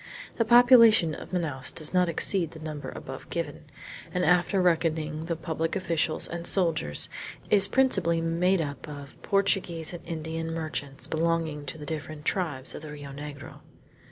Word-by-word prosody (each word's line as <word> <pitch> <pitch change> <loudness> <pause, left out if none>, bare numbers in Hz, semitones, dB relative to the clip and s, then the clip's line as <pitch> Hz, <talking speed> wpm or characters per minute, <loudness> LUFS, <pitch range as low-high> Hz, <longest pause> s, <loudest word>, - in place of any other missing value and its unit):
The 230 - +2
population 230 -7 +7
of - - -8
Manaos 155 -7 -2
does 155 +1 -2
not 180 -1 +3
exceed 170 +1 +1
the 160 - -12
number 155 -2 -6
above - - -8
given, - - -4 0.5
and 180 0 0
after 180 +3 +3
reckoning 160 -3 0
the 170 0 -2
public 160 +1 -3
officials 165 -4 0
and 170 0 -5
soldiers, 160 - +2 0.4
is 200 -2 +7
principally 190 -12 +2
made 170 +3 +1
of 145 -2 -4
up 145 -2 -8
Portuguese 190 -5 0
and 175 - -7
Indian 165 0 -4
merchants 150 -4 -3
belonging 160 -2 -1
to 145 - -5
the 150 - -8
different 155 0 -6
tribes 150 -9 -1
of - - -8
the 155 -1 -8
Rio 145 -1 -8
Negro. 145 0 -9
165 Hz, 155 wpm, -27 LUFS, 155-180 Hz, 0.5 s, population